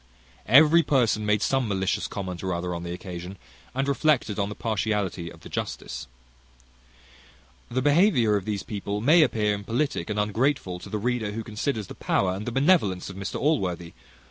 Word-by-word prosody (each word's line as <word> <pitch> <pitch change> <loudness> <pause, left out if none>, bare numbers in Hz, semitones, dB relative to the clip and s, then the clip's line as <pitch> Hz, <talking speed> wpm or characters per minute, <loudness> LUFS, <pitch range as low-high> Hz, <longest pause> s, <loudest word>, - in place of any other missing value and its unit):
Every 155 +5 +7
person 115 -8 +1
made 105 0 +2
some 135 -3 +1
malicious 95 -2 -1
comment 95 -3 -5
or 95 -2 -1
other 90 +1 -3
on 85 - -4
the 85 0 -5
occasion, 90 +1 -7 0.4
and 135 +1 0
reflected 140 -7 +1
on 100 0 0
the 105 - -6
partiality 100 -6 -2
of - - -15
the - - -10
justice. 65 +1 -5 1.6
The 130 +1 -1
behaviour 145 - +4
of 100 -2 -2
these 105 -2 -2
people 100 -1 -4
may 155 +10 +5
appear 110 -7 +2
impolitic 115 +7 -2
and 105 0 -1
ungrateful 105 -3 0
to - - -10
the 110 - -2
reader, 110 -1 -1
who 115 +1 -4
considers 110 +1 -3
the - - -9
power 95 -1 0
and 105 +5 -4
benevolence 130 - +2
of - - -11
Mr 95 +1 -5
Allworthy. 90 - 0
105 Hz, 170 wpm, -26 LUFS, 95-130 Hz, 1.6 s, Every